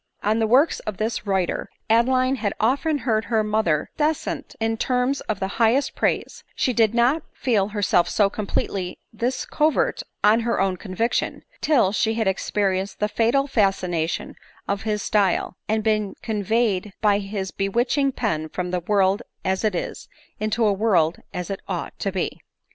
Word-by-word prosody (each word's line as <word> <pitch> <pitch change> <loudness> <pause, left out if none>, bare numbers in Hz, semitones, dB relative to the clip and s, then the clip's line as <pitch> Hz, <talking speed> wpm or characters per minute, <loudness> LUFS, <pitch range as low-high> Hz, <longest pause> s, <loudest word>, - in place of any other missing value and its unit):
On 215 +2 +2
the 220 - +2
"works 270 +8 +4
of 210 -3 -5
this 220 -1 -2
writer 190 -3 0 0.2
Adeline 255 +3 +3
had 205 -5 -2
often 280 +7 +2
heard 220 -3 +1
her 220 -2 +1
mother 210 -8 0
descant 310 0 -1
in 225 0 0
terms 250 +3 0
of 210 -2 -1
the 190 - -1
highest 255 +5 +3
praise; - - -1
but - - -21
she 255 - +2
did 225 -1 +3
not 250 +7 +3
feel 215 -7 +1
herself 200 -4 +2
so 205 - +3
completely 195 -2 -3 0.2
his 245 +4 -1
convert 315 +12 +1 0.2
on 215 +2 +6
her 235 0 0
own 190 -1 +1
conviction, 215 +5 -2 0.2
till 255 -11 +3
she 220 +2 +1
had 220 -3 0
experienced 190 0 0
the 210 - +2
fatal 230 +6 +2
fascination 185 - 0 0.3
of 200 0 -1
his 210 -2 -2
style, 195 -3 +1
and 220 0 +1
been 215 -2 0
conveyed 210 -2 0
by 205 -2 +4
his 195 -1 -4
be 195 0 -2
witching 250 +6 +1
pen 160 -11 -2
from 180 +2 -4
the 180 - 0
world 195 +3 +2 0.2
as 190 +2 0
it 215 -4 +1
is, - - -5 0.3
into 215 +2 +1
a 205 - +4
world 190 -6 +2
as 180 +2 -4
it 195 - -3
ought 180 -3 -4
to 195 - -1
be. 185 -2 -3
215 Hz, 170 wpm, -23 LUFS, 195-235 Hz, 0.3 s, on